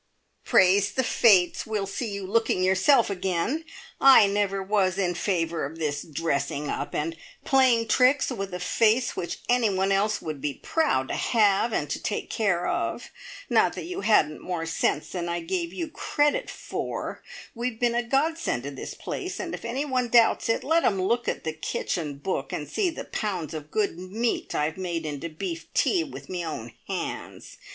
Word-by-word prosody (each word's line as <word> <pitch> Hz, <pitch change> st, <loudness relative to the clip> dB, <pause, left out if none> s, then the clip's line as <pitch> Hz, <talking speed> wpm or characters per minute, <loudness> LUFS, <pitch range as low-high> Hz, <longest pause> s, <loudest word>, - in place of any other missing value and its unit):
"Praise 190 Hz, +2 st, +4 dB
the 260 Hz, -, +1 dB
fates, 200 Hz, -7 st, +4 dB
we'll 215 Hz, -2 st, -1 dB
see 220 Hz, +4 st, -4 dB
you 200 Hz, -1 st, -4 dB
looking 205 Hz, -2 st, +1 dB
yourself 190 Hz, +6 st, +4 dB
again! 190 Hz, -, -1 dB, 0.4 s
I 270 Hz, -6 st, +8 dB
never 200 Hz, -1 st, 0 dB
was 190 Hz, -2 st, +1 dB
in 180 Hz, -3 st, +1 dB
favour 170 Hz, -3 st, -1 dB
of 145 Hz, +4 st, -5 dB
this 150 Hz, -3 st, -2 dB
dressing 145 Hz, -2 st, -2 dB
up, -, -, -3 dB
and 165 Hz, +2 st, -2 dB, 0.3 s
playing 255 Hz, -4 st, +4 dB
tricks 265 Hz, +2 st, +3 dB
with 195 Hz, -5 st, -4 dB
a 180 Hz, -, -4 dB
face 225 Hz, +6 st, +2 dB
which 170 Hz, -, -4 dB
anyone 200 Hz, -6 st, +2 dB
else 205 Hz, +2 st, +2 dB
would 155 Hz, -3 st, -6 dB
be 145 Hz, -2 st, -2 dB
proud 295 Hz, -, 0 dB
to -, -, -2 dB
have, 215 Hz, 0 st, +2 dB
and 150 Hz, -, -1 dB
to -, -, -3 dB
take 205 Hz, -, -3 dB
care 195 Hz, -6 st, +1 dB
of. -, -, -2 dB, 0.4 s
Not -, -, +3 dB
that -, -, -6 dB
you 365 Hz, +3 st, -5 dB
hadn't 155 Hz, -8 st, +3 dB
more 175 Hz, -3 st, -3 dB
sense 165 Hz, -2 st, 0 dB
than 175 Hz, -2 st, -4 dB
I 170 Hz, -, -2 dB
gave 340 Hz, -1 st, -2 dB
you 335 Hz, -2 st, -4 dB
credit 300 Hz, +6 st, 0 dB
for! -, -, -5 dB, 0.3 s
We've 235 Hz, -1 st, -3 dB
been 240 Hz, -1 st, +2 dB
a 240 Hz, -, +1 dB
godsend 275 Hz, -, 0 dB
to 140 Hz, -, -5 dB
this 135 Hz, -, -7 dB
place, 370 Hz, +1 st, -5 dB
and 350 Hz, -2 st, -4 dB
if -, -, -6 dB
anyone 255 Hz, +1 st, -1 dB
doubts 230 Hz, -1 st, +4 dB
it, 225 Hz, -, +1 dB
let 325 Hz, +3 st, +2 dB
'em 195 Hz, -, +2 dB
look 235 Hz, +6 st, 0 dB
at -, -, -2 dB
the 160 Hz, -, -2 dB
kitchen 155 Hz, -1 st, -3 dB
book, 145 Hz, -3 st, -3 dB
and 150 Hz, -, -4 dB
see 395 Hz, -4 st, 0 dB
the 325 Hz, -, -7 dB
pounds 185 Hz, -8 st, -3 dB
of 155 Hz, -1 st, -7 dB
good 200 Hz, -4 st, -1 dB
meat 215 Hz, +6 st, -2 dB
I've 150 Hz, +2 st, -1 dB
made 170 Hz, -3 st, -3 dB
into 150 Hz, +2 st, -4 dB
beef 165 Hz, 0 st, -6 dB
tea 355 Hz, -4 st, +3 dB
with 300 Hz, -, -9 dB
me 180 Hz, -2 st, -4 dB
own 120 Hz, -8 st, -6 dB
hands. -, -, -5 dB
195 Hz, 180 wpm, -26 LUFS, 165-240 Hz, 0.4 s, I